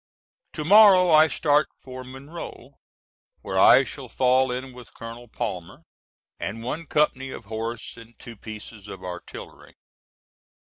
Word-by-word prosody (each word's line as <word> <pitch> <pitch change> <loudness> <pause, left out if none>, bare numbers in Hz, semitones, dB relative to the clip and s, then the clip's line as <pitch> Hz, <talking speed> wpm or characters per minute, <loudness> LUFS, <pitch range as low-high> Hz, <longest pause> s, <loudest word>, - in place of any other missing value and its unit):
To 150 - -5
morrow 190 -2 +7
I 155 0 +7
start 150 -1 +2
for 130 -1 -10
Monroe, 135 +6 -10 0.6
where - - -2
I - - +7
shall - - -8
fall 130 0 +2
in 130 +1 -5
with 125 -2 -14
Colonel 115 +1 -9
Palmer 90 -5 -6 0.6
and 100 +6 -5
one 155 +7 -5
company 135 -3 +1
of 120 - -9
horse 115 +3 -6
and 115 0 -15
two 115 - -11
pieces 110 -1 -10
of 95 -2 -9
artillery. 90 -1 -10
125 Hz, 135 wpm, -24 LUFS, 110-150 Hz, 0.6 s, morrow